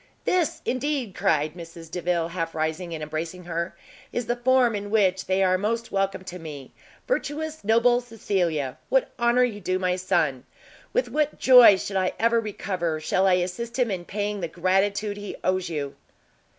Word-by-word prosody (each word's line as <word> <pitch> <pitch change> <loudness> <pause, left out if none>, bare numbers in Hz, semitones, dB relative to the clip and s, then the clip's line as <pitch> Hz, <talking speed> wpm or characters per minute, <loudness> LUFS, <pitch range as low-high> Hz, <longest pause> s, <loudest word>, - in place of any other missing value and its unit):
"This, 355 -5 0
indeed," 255 -4 -1
cried 155 -3 +1
Mrs 165 -1 -11
Delvile, 175 -2 -1
half 165 -2 -4
rising 160 +2 -2
and 155 - -6
embracing 160 +4 -5
her, 170 0 -3 0.4
"is 240 - -2
the 240 - 0
form 245 -1 +3
in 205 0 -4
which 190 -3 +2
they 190 +1 +2
are 185 0 +3
most 230 +3 -2
welcome 195 -1 -1
to 180 -1 -8
me! 145 -5 -9 0.3
virtuous, 315 - -2
noble 235 +3 +4
Cecilia! 180 - -2
what - - +2
honour 240 +1 +4
you 215 -4 -2
do 185 +1 0
my 185 -1 0
son! 170 -8 0 0.5
with - - +1
what 300 -1 0
joy, 250 -6 +8
should 195 +1 -3
I 185 -1 +1
ever 230 +1 +3
recover, 185 -7 -3
shall 185 +5 +1
I 185 - +5
assist 185 +7 -2
him 245 -4 +1
in 180 -2 -4
paying 205 +1 -3
the 170 - -2
gratitude 195 +4 0
he 205 0 -6
owes 185 -1 0
you!" 145 -4 -3
190 Hz, 175 wpm, -25 LUFS, 170-230 Hz, 0.5 s, joy